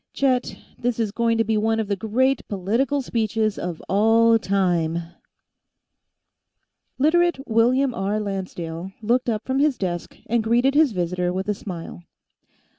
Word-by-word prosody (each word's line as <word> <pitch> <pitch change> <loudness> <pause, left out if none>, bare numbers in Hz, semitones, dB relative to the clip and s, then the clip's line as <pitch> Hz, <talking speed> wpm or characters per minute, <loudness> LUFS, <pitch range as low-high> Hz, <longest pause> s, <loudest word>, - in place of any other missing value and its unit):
Chet, 260 -2 0 0.2
this 240 -1 -1
is 220 -3 0
going 230 +1 +1
to 225 - +3
be 220 0 0
one 225 +1 +1
of 220 - -1
the 200 - 0
great 245 +6 +1
political 230 +9 0
speeches 220 -2 -1
of 175 -2 -5
all 225 +3 +4
time 175 -5 0 0.2
" - - -47 1.5
Literate 315 0 +2
William 245 +4 +2
R. 205 -1 -1
Lancedale 185 -3 -5
looked 245 +3 +1
up 220 -1 -2
from 265 +1 0
his 290 -2 +2
desk 175 -3 -4
and 235 0 0
greeted 240 +4 +2
his 300 -2 +4
visitor 180 -1 -1
with 190 +2 -3
a 210 - +1
smile. 175 -4 -8
220 Hz, 150 wpm, -23 LUFS, 195-245 Hz, 1.5 s, all